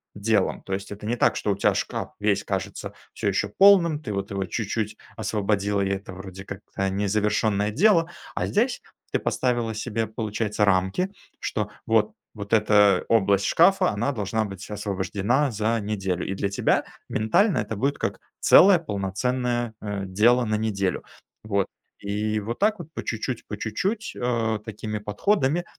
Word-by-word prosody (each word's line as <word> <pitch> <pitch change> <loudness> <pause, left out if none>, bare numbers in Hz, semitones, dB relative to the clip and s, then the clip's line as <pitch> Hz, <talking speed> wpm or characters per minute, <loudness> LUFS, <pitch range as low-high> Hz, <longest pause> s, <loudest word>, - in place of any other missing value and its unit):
делом. 100 -1 +1
То 95 - -5
есть, 95 +1 -4
это 105 +1 -8
не 115 +3 0
так, - - +3
что 105 - -1
у - - +1
тя - - +3
шкаф - - -3
весь - - +1
кажется - - -4 0.2
всё - - -3
еще 100 +1 0
полным, 170 - +5
ты, 105 - -5
вот, 100 0 -3
его 100 -1 -2
чуть-чуть 105 +3 -3 0.2
освободила, 100 -1 0
и 95 - 0
это, 95 0 -4
вроде, 95 +1 -9
как-то 95 0 -4
незавершенное 105 +1 +1
дело. 170 - +4 0.3
А - - 0
здесь 240 +5 +1 0.3
ты - - +1
поставила 120 -3 0
себе, 115 +1 -2
получается, 110 -1 -2
рамки, 95 - +1 0.3
что 105 -1 -2 0.2
вот 110 -2 +2 0.2
вот 100 0 -6
эта 105 -2 +5
область 100 -3 +3
шкафа, 190 - +4
она 115 +7 -1
должна 110 -1 -1
быть 100 -1 -8
освобождена 105 +6 0
за 110 +1 0
неделю. 95 -4 -2
И 95 - -2
для 100 +1 -1
тебя 100 - +1 0.2
ментально 160 - +2
это 110 - -2
будет 135 +7 0
как - - -3 0.2
целое 190 -1 +7
полноценное, 120 - -2
э, 105 -2 -3
дело 115 +6 +3
на 110 -1 0
неделю, 100 -4 -1 0.4
вот. 100 -3 0 0.3
И 105 +2 -1
вот 110 +3 -4
так 210 0 +2
вот, 170 - -7
по - - -5
чуть-чуть, 115 +1 -3
по 105 - -5
чуть-чуть, 190 - -2
э, 115 -3 0
такими 105 0 -5
подходами, 140 - 0
105 Hz, 165 wpm, -25 LUFS, 100-120 Hz, 0.4 s, целое